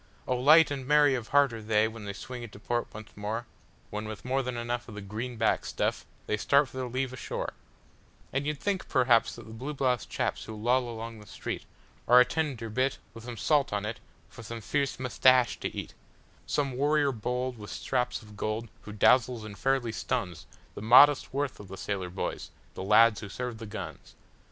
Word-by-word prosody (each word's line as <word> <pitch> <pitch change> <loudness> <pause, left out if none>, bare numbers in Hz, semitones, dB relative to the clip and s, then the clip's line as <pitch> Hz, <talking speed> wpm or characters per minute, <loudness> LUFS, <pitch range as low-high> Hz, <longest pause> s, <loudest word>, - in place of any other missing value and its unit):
Oh, 130 - +1
light 150 +5 +6
and 135 -2 -4
merry 150 -1 +5
of 120 -3 -3
heart 140 -3 +4
are 115 - -6
they 105 0 +2
when 110 -1 -8
they 100 - -4
swing 120 +5 -7
into 110 -3 -9
port 120 +3 -2
once 110 0 -11
more, 110 +3 -3 0.5
When, 105 +1 -4
with 110 -1 -8
more 135 +1 +1
than 125 -2 -4
enough 120 +1 -3
of 105 - -9
the 105 - -6
"green 115 +5 -5
backed 110 0 +1
stuff," - - -2 0.2
they 105 - 0
start 140 +6 +3
for 130 - -10
their 130 -1 -2
leave 130 +1 -2
o' - - -5
shore; - - -4 0.8
And 140 +2 -1
you'd 150 -1 -2
think, 200 -2 -2
perhaps, 125 -3 +3
that - - -11
the 110 - -10
blue 135 +6 -5
bloused 125 -5 0
chaps - - -2
who 110 - -7
loll 120 +3 +1
along 115 -1 -7
the 105 - -14
streetAre - - -5 0.5
a 125 - +7
tender 130 -4 -2
bit, 130 +4 0 0.2
with 115 +2 -9
salt 145 +5 +2
on 105 0 -1
it, 110 +2 -4 0.3
for - - -12
some 115 +1 -6
fierce 140 +4 -1
"mustache" 130 -1 +4
to - - -2
eat—Some 140 -2 -5
warrior 145 +2 +2
bold, 125 +1 -3
with 105 - -8
straps 125 -2 -2
of 105 -1 -14
gold, 110 +2 -3
who 105 - -9
dazzles 120 +2 +3
and 105 -1 -8
fairly 135 -1 0
stunsThe 110 -6 -3 0.4
modest 130 +6 +7
worth 140 0 -2
of 100 - -10
the 95 +1 -8
sailor 95 -3 -3
boys—the 95 0 -6
lads 110 +2 +5
who 105 - -7
serve 125 0 -5
the 115 - -7
guns. 100 - -8
120 Hz, 200 wpm, -29 LUFS, 110-130 Hz, 0.8 s, a